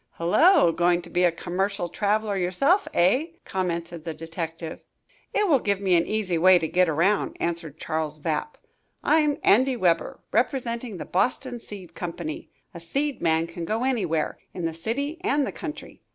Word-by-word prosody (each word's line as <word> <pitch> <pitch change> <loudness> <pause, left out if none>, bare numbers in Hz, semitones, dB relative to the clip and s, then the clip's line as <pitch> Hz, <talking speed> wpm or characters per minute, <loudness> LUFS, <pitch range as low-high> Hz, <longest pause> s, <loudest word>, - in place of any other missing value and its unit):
"Hullo, 175 - +5
going 175 +1 +2
to - - -11
be 180 0 +3
a 175 - +4
commercial 190 +3 -2
traveler 210 +2 0
yourself, 195 - +2
eh?" 225 - +3 0.2
commented 170 -3 -3
the 165 -1 -5
detective. 165 0 -6 0.5
"It 420 0 +2
will 290 -7 +4
give 200 -4 0
me 195 -2 +1
an 170 -1 +3
easy 200 -6 0
way 185 +2 +7
to 160 - -1
get 180 +1 +2
around," 170 +7 +1
answered 165 -3 -3
Charles 155 -1 -3
Vapp. 155 - -3 0.5
"I'm 300 -2 +3
Andy 255 +5 +4
Weber, 170 -6 +1
representing 235 -2 -1
the - - -6
Boxton 245 +5 0
Seed 190 -7 -10
Company. 170 -3 -6 0.2
A 170 - -8
seed 275 - -2
man 160 -1 +2
can 170 0 -7
go 220 +7 -1
anywhere, 185 -12 0 0.2
in 175 -2 -3
the 165 - -1
city 280 - -3
and 295 -8 +2
the - - -4
country. 315 -4 -8
185 Hz, 165 wpm, -25 LUFS, 170-240 Hz, 0.5 s, way